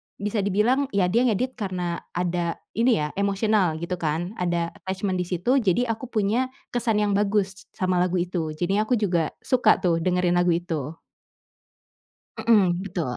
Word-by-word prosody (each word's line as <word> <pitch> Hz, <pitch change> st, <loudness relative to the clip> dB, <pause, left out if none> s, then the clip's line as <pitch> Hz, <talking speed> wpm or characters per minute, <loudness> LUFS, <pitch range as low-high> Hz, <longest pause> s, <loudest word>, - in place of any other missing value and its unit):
bisa 210 Hz, +1 st, -2 dB
dibilang, 215 Hz, +8 st, +2 dB
ya, 195 Hz, -, +3 dB
dia 240 Hz, +5 st, +3 dB
ngedit 255 Hz, +4 st, 0 dB
karena 180 Hz, -4 st, -3 dB, 0.2 s
ada, 175 Hz, -1 st, -1 dB, 0.2 s
ini 235 Hz, +2 st, +3 dB
ya, 150 Hz, -, -3 dB
emosional 200 Hz, -3 st, +2 dB
gitu, 175 Hz, +1 st, -4 dB
kan, 165 Hz, +4 st, -2 dB
ada 170 Hz, -1 st, 0 dB
attachment 190 Hz, 0 st, -3 dB
di 175 Hz, -, -4 dB
situ, 190 Hz, +10 st, +1 dB
jadi, 220 Hz, +4 st, +2 dB
aku 225 Hz, +3 st, -5 dB
punya, 225 Hz, +4 st, 0 dB, 0.2 s
kesan 230 Hz, -3 st, +1 dB
yang 205 Hz, -, +1 dB
bagus 200 Hz, -1 st, 0 dB
sama 185 Hz, -1 st, +1 dB
lagu 180 Hz, 0 st, +1 dB
itu. 175 Hz, -3 st, -2 dB
Jadinya 195 Hz, +5 st, 0 dB
aku 250 Hz, -, +4 dB
juga 175 Hz, -6 st, +1 dB
suka 255 Hz, -1 st, +4 dB
tuh, 165 Hz, -2 st, +1 dB
dengerin 180 Hz, 0 st, +1 dB
lagu 175 Hz, 0 st, +2 dB
itu. 165 Hz, -3 st, -4 dB, 1.4 s
Mhm, 190 Hz, -6 st, +3 dB
betul. 175 Hz, -9 st, -3 dB
190 Hz, 160 wpm, -24 LUFS, 175-215 Hz, 1.4 s, aku